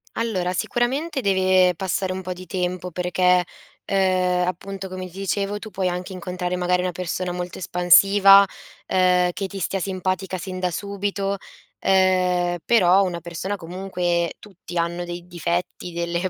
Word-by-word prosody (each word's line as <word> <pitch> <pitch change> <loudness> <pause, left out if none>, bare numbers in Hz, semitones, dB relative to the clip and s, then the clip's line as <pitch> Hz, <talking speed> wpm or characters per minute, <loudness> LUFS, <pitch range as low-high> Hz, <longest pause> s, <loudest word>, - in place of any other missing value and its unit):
Allora, 195 -6 -1
sicuramente 265 - -1
deve 185 -3 +3
passare 185 +1 -2
un 190 - -4
pò 185 0 -4
di 185 +1 -11
tempo 180 0 -3
perché, 180 +1 +2 0.4
uhm, 185 -2 +2
appunto, 190 +2 -5
come 185 0 -6
ti 185 +3 -11
dicevo, 200 +1 -1
tu 215 +1 -8
puoi 185 -1 -1
anche 180 +2 -3
incontrare 180 0 -3
magari 180 0 +1
una 180 0 -1
persona 180 +1 -3
molto 180 0 -5
espansiva, 195 +3 +6 0.4
uhm, 180 -1 +3
che 195 +2 -4
ti 195 0 -7
stia 195 +2 -1
simpatica 185 0 -2
sin 185 0 -6
da 180 -1 0
subito, 200 +1 -3 0.5
uhm, 180 -2 +3
però 195 -4 +5
una 175 -3 -3
persona 175 +4 -4
comunque 175 -1 -2
tutti 185 -3 -10
hanno 170 +1 -1
dei 175 0 -7
difetti, 175 0 -3
delle 170 +2 -2
185 Hz, 150 wpm, -23 LUFS, 180-195 Hz, 0.5 s, espansiva